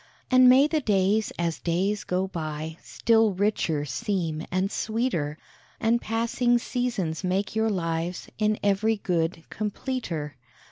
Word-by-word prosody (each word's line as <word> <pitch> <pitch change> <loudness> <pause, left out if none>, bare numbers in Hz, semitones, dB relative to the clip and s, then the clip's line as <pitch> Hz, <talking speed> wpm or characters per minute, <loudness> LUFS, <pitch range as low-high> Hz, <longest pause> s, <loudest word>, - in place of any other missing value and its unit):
And 255 0 +7
may 265 +3 +7
the 305 0 0
days 205 -1 +2
as 170 -1 -1
days 195 +5 0
go 185 +1 0
by, 160 -2 -5
Still 225 -2 +2
richer 180 -6 0
seem 160 +4 -2
and 185 +2 0
sweeter, 215 - -1 0.4
And 230 +1 +2
passing 235 +2 +1
seasons 230 -10 -2
make 190 +3 -1
your 220 0 +2
lives 170 -2 -2
In 215 0 +2
every 205 +2 +2
good 165 -3 -1
completer. 200 - -4
195 Hz, 130 wpm, -26 LUFS, 165-225 Hz, 0.4 s, And